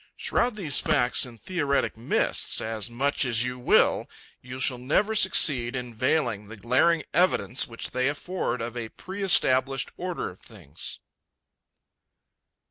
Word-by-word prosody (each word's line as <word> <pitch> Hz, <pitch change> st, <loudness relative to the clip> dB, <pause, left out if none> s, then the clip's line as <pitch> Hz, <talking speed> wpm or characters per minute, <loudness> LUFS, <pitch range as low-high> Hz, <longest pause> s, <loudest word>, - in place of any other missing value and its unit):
Shroud 240 Hz, -2 st, 0 dB
these 170 Hz, -9 st, -1 dB
facts 135 Hz, -5 st, +2 dB
in 120 Hz, -2 st, -13 dB
theoretic 145 Hz, -, -1 dB
mists 115 Hz, +2 st, +1 dB
as 110 Hz, 0 st, -4 dB
much 140 Hz, +6 st, 0 dB
as 120 Hz, -3 st, +2 dB
you 125 Hz, 0 st, -4 dB
will, 125 Hz, -, +3 dB, 0.3 s
you 125 Hz, +1 st, -8 dB
shall 130 Hz, -2 st, 0 dB
never 185 Hz, -, +1 dB
succeed 140 Hz, -, +3 dB
in 125 Hz, -2 st, -5 dB
veiling 120 Hz, -4 st, 0 dB
the 110 Hz, +1 st, -10 dB
glaring 130 Hz, +9 st, +2 dB
evidence 175 Hz, -7 st, +2 dB
which 115 Hz, -1 st, -7 dB
they 130 Hz, +1 st, 0 dB
afford 145 Hz, -4 st, -3 dB
of 120 Hz, 0 st, -6 dB
a 115 Hz, -2 st, -5 dB
pre 190 Hz, -, -9 dB
established 135 Hz, -8 st, +3 dB
order 180 Hz, -, -4 dB
of 90 Hz, -, -18 dB
things. 95 Hz, -11 st, -8 dB
130 Hz, 140 wpm, -26 LUFS, 120-160 Hz, 0.3 s, will